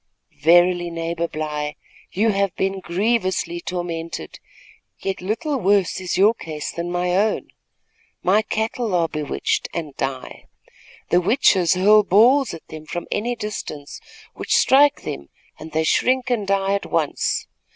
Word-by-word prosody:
"Verily, 175 Hz, +2 st, +4 dB
neighbor 165 Hz, 0 st, -3 dB
Bly, 150 Hz, -2 st, -4 dB, 0.4 s
you 215 Hz, +4 st, +2 dB
have 195 Hz, -2 st, 0 dB
been 195 Hz, 0 st, -1 dB
grievously 185 Hz, -2 st, -1 dB
tormented; 170 Hz, -1 st, -5 dB, 0.6 s
yet 195 Hz, -2 st, -4 dB
little 250 Hz, -, -2 dB
worse 195 Hz, -2 st, +2 dB
is 180 Hz, -2 st, -2 dB
your 205 Hz, +4 st, +5 dB
case 155 Hz, -8 st, -6 dB
than 170 Hz, +1 st, -4 dB
my 180 Hz, 0 st, 0 dB
own. 210 Hz, +3 st, 0 dB, 0.7 s
My 200 Hz, +4 st, +4 dB
cattle 220 Hz, 0 st, -2 dB
are 170 Hz, -1 st, +2 dB
bewitched 155 Hz, -2 st, -2 dB
and 155 Hz, -5 st, -5 dB
die. 135 Hz, -1 st, -5 dB, 0.6 s
The 175 Hz, -, +4 dB
witches 185 Hz, -, +3 dB
hurl 210 Hz, +4 st, +6 dB
balls 240 Hz, +8 st, +4 dB
at 165 Hz, -, -10 dB
them 155 Hz, -1 st, -10 dB
from 175 Hz, +1 st, -5 dB
any 235 Hz, +4 st, -1 dB
distance, 155 Hz, -10 st, -6 dB, 0.3 s
which -, -, -1 dB
strike 285 Hz, +2 st, +4 dB
them, 70 Hz, 0 st, -6 dB, 0.3 s
and 160 Hz, +1 st, -9 dB
they 160 Hz, +1 st, 0 dB
shrink 255 Hz, +9 st, +1 dB
and 215 Hz, -5 st, 0 dB
die 195 Hz, 0 st, +1 dB
at 200 Hz, -, -2 dB
once. -, -, -1 dB
185 Hz, 140 wpm, -21 LUFS, 165-210 Hz, 0.7 s, hurl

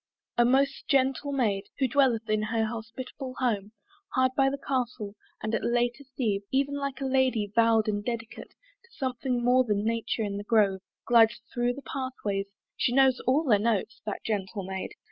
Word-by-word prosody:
A 240 Hz, -, +4 dB
most 270 Hz, +2 st, +2 dB
gentle 270 Hz, +1 st, +2 dB
maid 210 Hz, -8 st, 0 dB
Who 270 Hz, -, +2 dB
dwelleth 240 Hz, -4 st, +2 dB
in 215 Hz, 0 st, +1 dB
her 220 Hz, +1 st, 0 dB
hospitable 240 Hz, +4 st, -6 dB
home 215 Hz, -5 st, -1 dB, 0.4 s
Hard 260 Hz, -1 st, +3 dB
by 270 Hz, -1 st, +4 dB
the 280 Hz, -, -3 dB
Castle, 245 Hz, -7 st, -2 dB, 0.3 s
and 215 Hz, +1 st, -2 dB
at -, -, 0 dB
latest 240 Hz, +3 st, 0 dB
eve, 210 Hz, -6 st, 0 dB
(Even 275 Hz, +1 st, +1 dB
like 280 Hz, -1 st, -3 dB
a -, -, -1 dB
Lady 260 Hz, -6 st, +1 dB
vow'd 225 Hz, -1 st, +4 dB
and 205 Hz, -1 st, -1 dB
dedicate 230 Hz, -1 st, -5 dB
To -, -, -30 dB
something 255 Hz, -, -2 dB
more 255 Hz, +1 st, +5 dB
than 210 Hz, -3 st, -1 dB
nature 230 Hz, 0 st, -1 dB
in 200 Hz, -1 st, -3 dB
the 205 Hz, -, -5 dB
grove) 205 Hz, -4 st, +2 dB, 0.2 s
Glides 230 Hz, -1 st, +5 dB
thro' 240 Hz, 0 st, +1 dB
the 275 Hz, +2 st, -10 dB
pathways; 215 Hz, -7 st, -3 dB, 0.3 s
she 245 Hz, -, +1 dB
knows 265 Hz, -1 st, +5 dB
all 275 Hz, +5 st, +4 dB
their 225 Hz, -9 st, +4 dB
notes, 225 Hz, 0 st, -1 dB
That 210 Hz, -, -4 dB
gentle 200 Hz, -1 st, -2 dB
Maid! 190 Hz, 0 st, -5 dB
240 Hz, 180 wpm, -28 LUFS, 215-265 Hz, 0.4 s, more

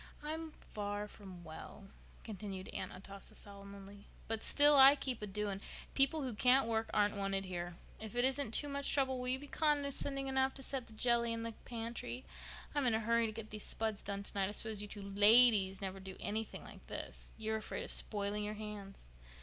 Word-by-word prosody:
I'm 315 Hz, +1 st, -4 dB
far 205 Hz, 0 st, -3 dB
from 190 Hz, -4 st, -11 dB
well," 160 Hz, +4 st, -10 dB, 0.4 s
continued 195 Hz, -3 st, -6 dB
Aunt 185 Hz, -, -4 dB
Atossa 195 Hz, +1 st, -9 dB
solemnly, 200 Hz, 0 st, -9 dB, 0.2 s
"but 225 Hz, 0 st, -2 dB
still 290 Hz, 0 st, +7 dB
I 270 Hz, +1 st, +10 dB
keep 260 Hz, -5 st, -3 dB
a 210 Hz, -, -3 dB
doing. 200 Hz, 0 st, -3 dB, 0.3 s
People 275 Hz, +3 st, +4 dB
who 255 Hz, -3 st, -2 dB
can't 250 Hz, +4 st, +5 dB
work 225 Hz, 0 st, 0 dB
aren't 205 Hz, 0 st, +2 dB
wanted 195 Hz, -1 st, -1 dB
here. 175 Hz, -1 st, -4 dB, 0.2 s
If 220 Hz, 0 st, -7 dB
it 245 Hz, +1 st, +3 dB
isn't 265 Hz, -3 st, +1 dB
too 290 Hz, -, +3 dB
much 280 Hz, 0 st, -1 dB
trouble 265 Hz, -2 st, +1 dB
will 250 Hz, -, -3 dB
you 255 Hz, +1 st, +1 dB
be 285 Hz, -, -9 dB
condescending 285 Hz, -2 st, 0 dB
enough 265 Hz, 0 st, +1 dB
to 270 Hz, -, -6 dB
set 260 Hz, -2 st, -4 dB
the 220 Hz, -, -14 dB
jelly 235 Hz, +1 st, +2 dB
in 230 Hz, 0 st, -2 dB
the 230 Hz, -, -3 dB
pantry? 240 Hz, +2 st, -5 dB, 0.5 s
I'm 290 Hz, -3 st, +2 dB
in 230 Hz, -, +4 dB
a -, -, +2 dB
hurry 230 Hz, +1 st, +3 dB
to -, -, -4 dB
get 215 Hz, 0 st, -8 dB
these 215 Hz, -1 st, -6 dB
spuds 220 Hz, -1 st, -2 dB
done 200 Hz, -1 st, -4 dB
tonight. 200 Hz, -1 st, -1 dB
I -, -, -5 dB
suppose 220 Hz, -1 st, -1 dB
you 210 Hz, -, -5 dB
two 205 Hz, -1 st, -7 dB
ladies 205 Hz, -1 st, +6 dB
never 195 Hz, 0 st, -4 dB
do 190 Hz, 0 st, -8 dB
anything 215 Hz, +1 st, -3 dB
like -, -, -13 dB
this. -, -, -6 dB
You'd 220 Hz, -1 st, -3 dB
be -, -, +1 dB
afraid 215 Hz, -, -5 dB
of -, -, -4 dB
spoiling 205 Hz, 0 st, +1 dB
your 210 Hz, +1 st, -3 dB
hands." 210 Hz, -, -8 dB
220 Hz, 205 wpm, -36 LUFS, 200-255 Hz, 0.5 s, I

